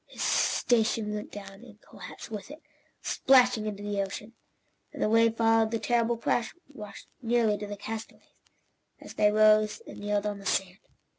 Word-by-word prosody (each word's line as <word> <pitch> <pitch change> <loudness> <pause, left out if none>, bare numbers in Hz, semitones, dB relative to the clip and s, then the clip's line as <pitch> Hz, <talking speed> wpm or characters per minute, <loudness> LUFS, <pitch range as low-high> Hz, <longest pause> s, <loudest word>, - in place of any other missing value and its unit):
His - - -6
station 220 -2 +1
went 210 0 -6
down 195 +1 -10
in 220 -4 -15
collapse - - -11
with 210 +1 -6
it, 300 +3 -12 0.4
splashing 250 -4 +3
into 205 -1 -5
the 205 -1 -1
ocean, 205 +3 -6 0.6
and - - -11
the - - +2
wave 225 +1 +4
that - - -24
followed 225 -1 +3
the 230 - -1
terrible 235 +1 +1
crash 230 0 -1
washed 210 -8 -11 0.2
nearly 230 -3 +2
to 205 - -5
the 205 0 -6
castaways, 220 +2 -7 0.8
as - - -11
they 210 0 +3
rose 215 0 +4
and - - -10
kneeled 205 0 -1
on 205 -1 -3
the 195 - -13
sand. 190 0 -1
215 Hz, 175 wpm, -28 LUFS, 205-230 Hz, 0.8 s, wave